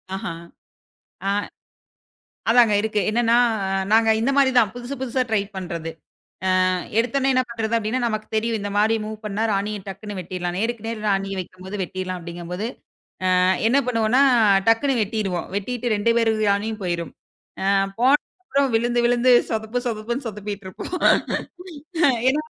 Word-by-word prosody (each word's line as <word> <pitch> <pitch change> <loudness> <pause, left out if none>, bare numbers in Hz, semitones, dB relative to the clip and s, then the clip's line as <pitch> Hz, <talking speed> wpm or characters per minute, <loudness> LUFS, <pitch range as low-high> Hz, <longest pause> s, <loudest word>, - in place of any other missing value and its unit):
அஹா. 195 -3 -4 1.0
ஆ. - - +3 1.2
அதாங்க 230 -2 +5
இருக்கு. 215 0 0
என்னான்னா, 235 +1 +3 0.6
நாங்க 225 0 +5
இந்த 235 +5 +1
மாரி 275 -2 +5
தான், 220 -4 +4
புதுசு 245 +2 -6
புதுசா 260 0 0
ட்ரை 220 - +3 0.2
பண்றது. 170 -3 -5 0.8
அ - - +3 0.3
எடுத்தவுன்னே 265 +3 +1
என்ன 255 - +4
பண்றது? 230 -1 -3
அப்டின்னா, 225 +3 -1
நமக்குத் 215 -2 -3
தெரியும். 225 +1 0
இந்த 205 0 -4
மாரி 215 +2 +3
மூவ் 215 0 -6
பண்ணா, 210 +1 -3
ராணிய 205 +1 -1
டக்குன்னு 205 +1 -7
வெட்டிறலான்னு. 180 0 -4
"நேருக்கு 230 -1 -2
நேர் 225 -2 -4
ராணிய 195 0 0
வக்கும்போது 185 +2 -7
வெட்றடலாம்" 185 0 -4
அப்டிங்கும்போது, 175 +4 -5 0.7
அ - - +3 0.3
என்னா 260 +5 +4
பண்ணுவோம்னா, 230 +1 +2 0.5
டக்குன்னு 240 +3 +3
வெட்டிருவோம். 200 -5 -2
வெட்டிட்டு 240 +3 -2
2 210 +3 +2
பேரு 230 -1 +3 0.2
ராணியும் 215 +2 -1
போயிரும். 170 -2 -2 0.5
அ - - -1 0.3
போனப்புறம் 280 +2 +1
விழுந்து 240 +1 +1
விழுந்து 245 +1 +3 0.2
சொதப்பு 220 +2 -2
சொதப்புன்னு 235 +3 -3
சொதுப்பிட்ருப்போம். 205 - -6 1.3
ஏன்னா, 295 +3 +1
220 Hz, 135 wpm, -22 LUFS, 195-240 Hz, 1.3 s, அதாங்க